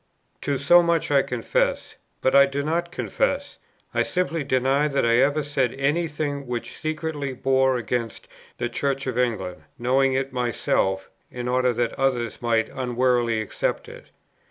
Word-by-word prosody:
To 140 -1 -1
so 175 +6 +6
much 170 -3 0
I 140 -1 +5
confess; 125 -3 -1 0.3
but 130 - +2
I 140 0 +7
do 140 +1 -3
not 170 +3 -1
confess, - - -2 0.3
I - - +2
simply 170 -4 -1
deny 135 +2 +2
that 140 -4 0
I 115 0 +4
ever 145 +4 +3
said 135 -4 0
any 145 +5 +1
thing 145 -3 -4
which 120 -1 -4
secretly 155 -3 -3
bore 130 0 +2
against 115 0 -3 0.3
the 120 - -1
Church 135 +3 -2
of 130 -3 -2
England, 95 -9 -1 0.2
knowing 130 +2 +2
it 135 0 -1
myself, 105 -6 0 0.2
in 125 0 -5
order 125 0 +2
that 120 0 -1
others 125 -4 0
might 115 -2 +1
unwarily 125 -3 +1
accept 110 - -2
it. - - -12
130 Hz, 155 wpm, -24 LUFS, 120-145 Hz, 0.3 s, I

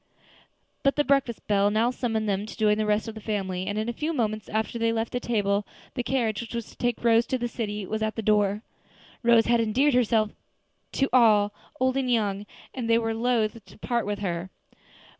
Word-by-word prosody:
But 275 - +2
the 295 - +2
breakfast 275 -4 +1
bell 205 -1 +3
now 220 +3 +2
summoned 225 -4 -2
them 200 +1 -1
to - - -9
join 210 0 +3
the 215 - 0
rest 210 +2 +1
of 225 - -5
the 220 - -9
family, 190 -4 -3
and, 205 - -2
in 215 +1 -1
a 240 - -2
few 305 +7 -2
moments 215 -5 -2
after 220 +2 -2
they 230 0 +2
left 225 0 -2
the 245 - -1
table, 205 -4 0 0.3
the 250 - -2
carriage 240 -4 0
which 235 0 -7
was 235 -2 -5
to - - -18
take 240 -1 -2
Rose 230 0 +4
to 260 - 0
the 240 -1 -2
city 210 -3 -4
was 220 +3 -3
at 220 0 -1
the 225 - -4
door. 210 0 +2 0.6
Rose 235 -2 +5
had 235 0 +3
endeared 255 +6 +2
herself 225 -3 +2 0.6
to 270 - +1
all, 210 -4 +5 0.3
old 260 +1 +2
and 260 -2 0
young, 205 -3 0 0.3
and 240 -3 -4
they 230 - +5
were 225 -1 -1
loath 230 -2 0
to - - -17
part 235 -1 -1
with 205 0 -1
her. 175 -1 -3
225 Hz, 215 wpm, -26 LUFS, 210-240 Hz, 0.6 s, Rose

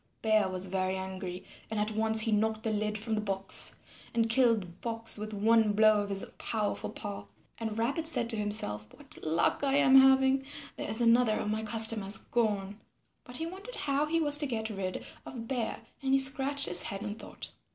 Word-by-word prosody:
Bear 215 -3 +2
was 185 0 -2
very 185 0 -2
angry 190 -1 -6 0.2
and 220 -1 -3
at 210 +1 -1
once 220 0 +3
he 225 - 0
knocked 220 +1 0
the 220 - -1
lid 210 0 -2
from 220 +1 -4
the 215 - 0
box 195 -2 +2 0.3
and 225 -1 +1
killed 225 -8 +2
Fox 230 -1 -1
with 215 +1 -6
one 220 +1 +2
blow 215 0 +4
of 205 - -5
his 195 -1 -3
powerful 215 -2 -3
paw. 100 0 -7 0.3
And 220 -1 -4
Rabbit 280 +8 -1
said 240 -7 0
to - - -1
himself, 205 - -2
"What - - -10
luck 160 - 0
I 275 -1 +1
am 270 -2 +5
having; 265 0 +4 0.3
there - - -6
is 220 +2 +1
another 230 -1 +4
of 210 - -3
my 215 +1 -2
customers 220 -2 +1
gone." 205 -3 -2 0.4
But 245 0 -7
he 325 - -4
wondered 390 +8 -9
how 285 +1 -1
he 330 +2 0
was 295 -2 +6
to 295 - +5
get 220 -3 -3
rid 190 -2 -5 0.2
of 235 -3 -8
Bear, 240 -4 -3 0.2
and 270 -1 0
he - - +6
scratched 270 +1 +4
his 175 0 +1
head 195 +1 -5
in 210 -1 -4
thought. 220 - -9
220 Hz, 200 wpm, -29 LUFS, 205-245 Hz, 0.4 s, was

